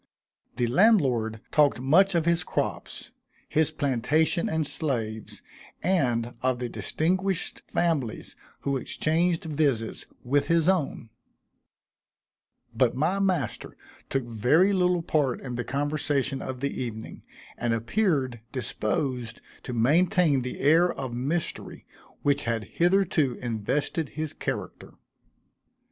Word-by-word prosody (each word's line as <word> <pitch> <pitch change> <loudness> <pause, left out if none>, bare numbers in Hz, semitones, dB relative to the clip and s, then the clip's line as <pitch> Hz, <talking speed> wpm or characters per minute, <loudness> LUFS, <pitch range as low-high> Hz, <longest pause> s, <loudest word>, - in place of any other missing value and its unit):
The 120 - +1
landlord 125 - +3
talked 145 -4 +3
much 175 +9 +4
of 165 -2 +2
his 170 0 +2
crops, - - -4 0.4
his 155 -1 +2
plantation 145 +5 +1
and 160 -1 0
slaves, 120 -8 -2 0.4
and 125 -10 +1
of 130 -1 +1
the 120 -1 -4
distinguished 185 +8 -1
families 150 -10 -1 0.3
who 140 -1 0
exchanged 165 +5 0
visits 145 -8 -1 0.2
with 140 +3 +1
his 165 -1 +2
own; 160 -11 0 1.6
but 120 +1 +2
my 160 +9 +1
master 155 - -1 0.3
took 135 -1 0
very 125 - +3
little 180 -2 +2
part 145 -6 0
in 125 -2 -6
the 120 0 -2
conversation 145 -1 -1
of 130 -1 -6
the 140 -1 -2
evening, 110 -3 -6 0.3
and 120 - -1
appeared 130 - 0
disposed 120 0 -2 0.2
to - - -7
maintain 155 - +3
the 125 0 -5
air 165 +5 +5
of 130 -3 -5
mystery 145 +8 -3 0.4
which 145 0 +1
had 115 -1 -1
hitherto 170 - +1
invested 130 +7 -2
his 155 -1 -4
character. - - -5
140 Hz, 115 wpm, -26 LUFS, 120-165 Hz, 1.6 s, air